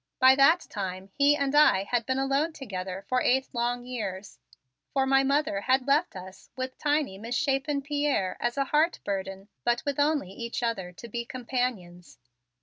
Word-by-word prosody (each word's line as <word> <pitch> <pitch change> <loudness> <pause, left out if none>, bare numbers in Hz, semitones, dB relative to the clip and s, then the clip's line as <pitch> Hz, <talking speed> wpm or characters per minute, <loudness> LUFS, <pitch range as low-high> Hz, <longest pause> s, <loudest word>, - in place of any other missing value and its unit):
By 260 +1 +7
that 275 +6 +5
time 190 -1 -5
he 285 +1 +4
and 280 -1 -1
I 295 -10 +5
had 235 +2 -1
been 260 0 0
alone 275 +4 0
together 190 -8 -6
for 255 0 +1
eight 265 +2 +2
long 245 0 -1
years, 205 -6 -6 0.5
for 270 -1 +2
my 270 0 +4
mother 275 -7 +1
had 260 +3 +2
left 290 - +2
us 190 +1 -11
with 260 0 -4
tiny, 290 -10 0
misshapen 275 +4 -1
Pierre 285 -9 0
as 240 +2 -1
a 275 - +1
heart 310 +5 +2
burden 195 0 -4 0.2
but 240 0 +1
with 285 -1 -2
only 290 -9 +1
each 235 +4 -5
other 195 -6 -2
to 235 - -10
be 235 +1 -4
companions. 235 - -4
255 Hz, 170 wpm, -27 LUFS, 200-280 Hz, 0.5 s, By